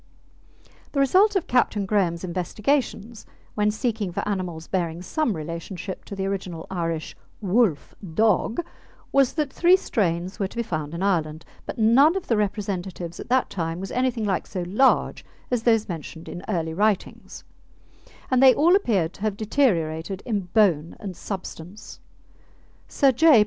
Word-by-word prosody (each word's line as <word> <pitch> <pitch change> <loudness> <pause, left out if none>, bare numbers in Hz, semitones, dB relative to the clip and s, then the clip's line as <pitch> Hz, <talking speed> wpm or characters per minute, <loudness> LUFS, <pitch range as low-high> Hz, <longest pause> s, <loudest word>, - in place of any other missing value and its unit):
The 280 - 0
result 380 +10 +4
of 380 - +1
Captain 220 -5 +1
Graham's 185 -4 0
investigations 210 +5 -2 0.3
when 210 0 +1
seeking 215 -3 -2
for - - -3
animals 180 -5 -3
bearing 170 -2 -2
some 240 - -1
relationship 170 +4 -6
to 200 - -7
the 195 0 -2
original 185 -4 -4
Irish 165 -3 -3 0.2
"Wolfe 200 -6 +1
Dogge" 215 - +1 0.5
was 275 -2 +3
that 300 -4 -2
three 355 +2 +5
strains 185 - -1
were 195 - 0
to 215 - -14
be 235 - 0
found 155 -6 -4
in 175 - -3
Ireland, 160 -5 0 0.2
but - - -5
none 255 +9 +5
of 385 - -3
the 230 - +1
representatives 195 -4 -3
at - - -8
that 255 +1 +2
time 165 -2 -3
was 195 0 -6
anything 250 -3 0
like 195 -3 -1
so 180 - -4
large 240 +9 +2 0.3
as 245 -2 +1
those 225 -2 +2
mentioned 165 -1 -7
in 175 - -7
early 165 -5 -1
writings, 205 +2 -1 0.9
and 255 0 +4
they 265 -1 +8
all 340 +5 +5
appeared 200 - +1
to - - -16
have 210 -2 -1
deteriorated 190 - 0
in 205 -6 -2
bone 170 -7 +3
and 195 -4 -6
substance. 190 0 -8 0.9
Sir 275 -2 +3
J. 295 0 +6
200 Hz, 155 wpm, -24 LUFS, 175-235 Hz, 0.9 s, they